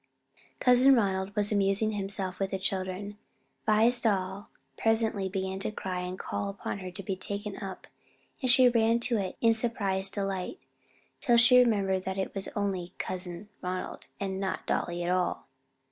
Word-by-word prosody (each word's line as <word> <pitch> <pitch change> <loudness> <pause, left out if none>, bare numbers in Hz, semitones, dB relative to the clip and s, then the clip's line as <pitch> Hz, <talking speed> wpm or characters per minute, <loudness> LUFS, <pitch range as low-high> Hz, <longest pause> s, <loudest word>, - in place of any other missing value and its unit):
Cousin 255 +2 +6
Ronald 195 -3 0
was 210 0 +3
amusing 200 +1 +2
himself 195 -2 -2
with 195 -1 0
the 195 - -2
children. 190 +2 -3 0.5
Vi's 225 +3 +5
doll 195 -2 -1 0.3
presently 220 -2 +1
began 190 0 -3
to - - -1
cry 185 -3 -4
and 180 +1 -4
call 200 - -3
upon 200 0 -5
her 185 -1 -6
to 190 +2 -8
be 190 +1 -2
taken 200 +2 -5
up, 195 -2 -7 0.6
and 255 - 0
she 255 0 +7
ran 230 -1 +3
to 235 -2 +1
it 190 -2 -4
in 230 -1 +5
surprised 200 -4 -1
delight, 195 - -3 0.6
till 240 -1 +3
she 240 +2 +7
remembered 200 -6 +2
that 190 0 -3
it 190 - -2
was 195 -1 -3
"only 190 -3 -2
Cousin 185 +1 -5
Ronald 185 0 -4
and 190 -1 -3
not 190 -1 -3
dolly 175 0 -1
at 175 - 0
all." 180 -1 0
195 Hz, 165 wpm, -29 LUFS, 190-220 Hz, 0.6 s, she